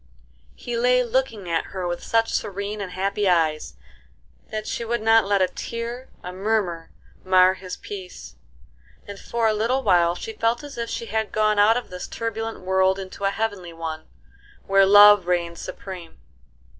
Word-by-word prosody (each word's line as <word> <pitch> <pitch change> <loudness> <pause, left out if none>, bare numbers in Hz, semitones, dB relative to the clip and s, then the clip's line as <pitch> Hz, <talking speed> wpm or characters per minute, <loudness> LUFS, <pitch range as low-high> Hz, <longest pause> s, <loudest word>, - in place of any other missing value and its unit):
He 240 - -5
lay 250 +1 +3
looking 235 -5 -2
at 165 -1 -1
her 185 -2 -5
with 175 0 -4
such 225 0 +1
serene 200 +1 -3
and 185 -2 -6
happy 195 +1 0
eyes 155 - +1 0.7
that 215 0 -4
she 235 - -3
would 235 -1 -2
not 225 -2 +4
let 200 -2 +3
a - - +2
tear, 235 +6 -6
a 180 - -6
murmur, 190 -4 -1 0.3
mar 185 0 +5
his 185 -1 -8
peace; 185 - -9 0.7
and 200 -1 -8
for 235 -1 -1
a 215 - +2
little 235 +5 0
while 175 -4 +3
she 445 - -7
felt 235 - 0
as 290 -1 -9
if 235 -1 -4
she 230 +1 -4
had 220 0 -2
gone 215 -1 +2
out 220 +3 +5
of 245 - -6
this 180 0 -6
turbulent 225 -1 -4
world 190 +1 +2
into 195 +1 -6
a - - +3
heavenly 200 -5 -3
one, 160 -1 -6 0.6
where 195 0 +4
love 205 -2 +8
reigned 170 -1 -1
supreme. 180 -4 -8
200 Hz, 170 wpm, -23 LUFS, 185-225 Hz, 0.7 s, love